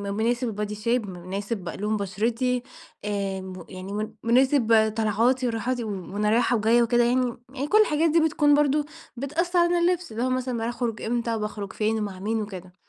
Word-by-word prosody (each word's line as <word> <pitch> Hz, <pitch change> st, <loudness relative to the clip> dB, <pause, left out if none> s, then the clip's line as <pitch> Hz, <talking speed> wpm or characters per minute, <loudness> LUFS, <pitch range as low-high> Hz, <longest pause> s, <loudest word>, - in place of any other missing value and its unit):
مناسب 240 Hz, +3 st, 0 dB
البادي 210 Hz, -1 st, -3 dB
شيب 225 Hz, 0 st, -1 dB
م -, -, -7 dB
مناسب 195 Hz, -1 st, -4 dB
لون 210 Hz, +5 st, -2 dB
بشرتي، 230 Hz, +6 st, -1 dB, 0.4 s
آآ 200 Hz, -2 st, -2 dB
م 185 Hz, -2 st, -8 dB
يعني 185 Hz, +1 st, -7 dB
من 215 Hz, +1 st, -3 dB
مناسب 230 Hz, -3 st, +4 dB
طلعاتي 230 Hz, +4 st, +2 dB
وراحاتي، 240 Hz, +2 st, -1 dB
و 220 Hz, -, -5 dB, 0.3 s
وأنا 210 Hz, +1 st, +1 dB
رايحة 235 Hz, +2 st, +3 dB
وجاية 230 Hz, +2 st, +4 dB
وكده 240 Hz, +1 st, +3 dB
يعني، 245 Hz, 0 st, +1 dB, 0.2 s
يعني 280 Hz, +2 st, -3 dB
كل 430 Hz, +4 st, +5 dB
الحاجات 320 Hz, -4 st, +2 dB
دي 330 Hz, -, +4 dB
بتكون 300 Hz, -2 st, +3 dB
برضه 295 Hz, 0 st, +2 dB, 0.3 s
بتأثَّر 340 Hz, +7 st, 0 dB
على 345 Hz, 0 st, +3 dB
اللبس، 350 Hz, -2 st, +1 dB
اللي 230 Hz, +3 st, -2 dB
هو 255 Hz, -, +1 dB
مثلًا 255 Hz, -1 st, -1 dB
باخرج 230 Hz, -1 st, -3 dB
إمتى 235 Hz, 0 st, -1 dB
وباخرج 210 Hz, -2 st, -4 dB
فين 220 Hz, +1 st, 0 dB
ومع 200 Hz, -3 st, -4 dB
مين 220 Hz, +3 st, -1 dB
وكده. 185 Hz, -3 st, -8 dB
230 Hz, 180 wpm, -25 LUFS, 210-255 Hz, 0.4 s, كل